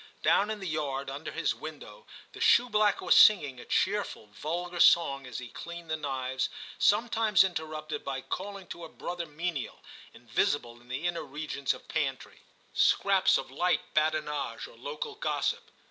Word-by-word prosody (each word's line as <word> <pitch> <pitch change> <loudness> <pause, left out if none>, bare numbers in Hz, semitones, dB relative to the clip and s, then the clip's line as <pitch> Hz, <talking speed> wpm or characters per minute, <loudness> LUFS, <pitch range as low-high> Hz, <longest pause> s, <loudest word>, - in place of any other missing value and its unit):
Down 205 - +4
in 215 -1 -3
the 190 - -5
yard 140 -3 -2
under 150 +3 -6
his 165 - 0
window 155 - -10 0.3
the - - -10
shoeblack 215 -4 +4
was 180 - +4
singing 145 -12 +6
a - - -10
cheer 205 +1 +1
ful - - -10
vulgar 175 +11 -4
song 140 -7 +5
as 125 - -6
he 125 -2 -7
cleaned 170 +2 -8
the - - +2
knives, 130 -3 -2 0.3
sometimes 220 -1 +4
interrupted 155 -4 -4
by 135 -1 -3
calling 195 +5 -5
to 170 - -7
a 165 - -8
brother 175 +1 -5
menial, 155 -2 -4 0.3
invisible 120 -4 -1
in 120 - -21
the 130 +7 -4
inner 175 -1 -1
regions 145 -1 -3
of - - -7
pantry, 145 -5 -3 0.3
scraps - - +4
of - - -6
light - - 0
badinage 155 -2 0
or - - -16
local 485 -2 -5
gossip. 425 - -2
155 Hz, 160 wpm, -29 LUFS, 140-190 Hz, 0.3 s, singing